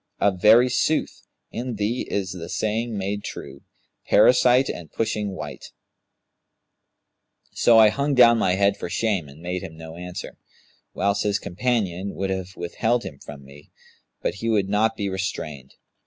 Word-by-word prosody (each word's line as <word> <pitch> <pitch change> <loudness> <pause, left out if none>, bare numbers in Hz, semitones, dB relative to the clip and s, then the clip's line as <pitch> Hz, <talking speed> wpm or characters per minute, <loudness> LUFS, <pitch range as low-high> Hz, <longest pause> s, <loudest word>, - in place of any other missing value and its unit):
Of 95 -3 +1
very 115 +5 +7
sooth, 130 +5 -1 0.2
in 120 0 -4
thee 105 +4 -2
is 95 -2 -2
the 85 -3 -7
saying 110 +1 -2
made 100 +1 -3
true, 70 0 -8 0.5
Parasite 125 +1 +5
and 85 -3 -6
pushing 105 -3 -2
wight.' - - -8 1.8
So 115 -1 +4
I 110 -1 +8
hung 140 +5 -1
down 120 -2 +6
my 90 - +2
head 100 +1 +2
for - - -6
shame 100 -8 -1
and 70 +3 -15
made 90 +1 -3
him 85 -4 -9
no 80 0 -10
answer, 90 0 -8 0.6
whilst 100 +1 +1
his 100 -1 +1
companion 100 -3 -2
would 95 0 -2
have 95 -1 -4
withheld 115 +7 -1
him 70 - -8
from 70 -2 -11
me, 70 +2 -16 0.5
but - - 0
he 115 - -1
would 100 -3 +1
not 110 +2 +2
be 100 - -2
restrained. 80 -8 -5
100 Hz, 155 wpm, -23 LUFS, 90-115 Hz, 1.8 s, I